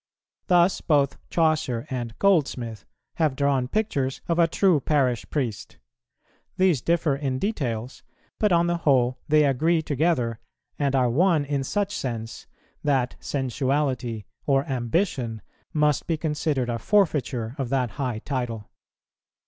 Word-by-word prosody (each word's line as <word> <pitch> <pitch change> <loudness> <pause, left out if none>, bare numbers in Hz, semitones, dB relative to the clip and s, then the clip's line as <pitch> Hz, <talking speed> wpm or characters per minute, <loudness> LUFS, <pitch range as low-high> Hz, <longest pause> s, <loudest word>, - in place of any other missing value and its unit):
Thus 180 0 +4
both 140 -3 +2
Chaucer 155 -7 +1
and 120 -3 -4
Goldsmith 135 - +1 0.3
have 155 -5 +1
drawn 140 -2 +1
pictures 140 - -1
of 170 0 0
a 170 - +5
true 180 -1 +3
parish 130 -4 0
priest; 125 -8 -3 0.8
these 185 -8 +3
differ 165 -3 +1
in 135 -2 -2
details, 130 - -3 0.4
but 210 -2 +2
on 170 0 +4
the 175 0 0
whole 130 -5 +2
they 155 0 +5
agree 160 +5 +2
together, 140 -7 0 0.4
and 140 -2 +1
are 130 -2 +3
one 165 +1 +3
in 140 -1 -1
such 205 +7 -1
sense, 115 -3 -5 0.4
that 135 -4 +1
sensuality, 130 -4 -1 0.2
or 135 -1 +3
ambition, 125 - -1 0.3
must 150 -2 +1
be 165 - 0
considered 150 -4 -1
a 115 - -2
forfeiture 135 - +1
of 130 -3 -2
that 125 -4 0
high 125 -4 -1
title. 120 -6 -3
140 Hz, 130 wpm, -25 LUFS, 125-160 Hz, 0.8 s, a